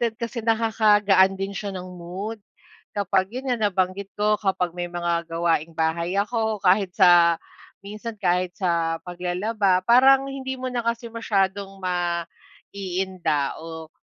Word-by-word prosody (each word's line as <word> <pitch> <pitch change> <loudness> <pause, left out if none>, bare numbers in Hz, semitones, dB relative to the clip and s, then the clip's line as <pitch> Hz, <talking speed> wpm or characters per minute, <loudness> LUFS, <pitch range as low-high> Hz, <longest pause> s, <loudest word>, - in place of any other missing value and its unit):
din, 230 -2 0
kasi 235 +1 -4
nakakagaan 210 -4 +3
din 195 +1 -4
siya 200 +1 -5
ng 180 - -6
mood, 185 +6 -6 0.6
kapag 190 -1 +1
yun 255 +3 -3
nga 220 -4 +1
nabanggit 190 +1 -1
ko, 210 0 +1
kapag 190 -4 0
may 175 0 -4
mga 170 -1 -2
gawaing-bahay 165 +1 -1
ako, 220 +1 0
kahit 190 +1 +4
sa 175 -3 +6 0.5
minsan, 215 +3 -7
kahit 180 -2 0
sa 170 -3 0
paglalaba, 185 +2 0
parang 265 +4 +6
hindi 265 -1 -5
mo 255 0 -4
na 240 - -1
kasi 235 0 -3
masyadong 200 -3 0
maiinda 175 -2 -3
o 160 -1 -9
190 Hz, 130 wpm, -24 LUFS, 175-220 Hz, 0.6 s, sa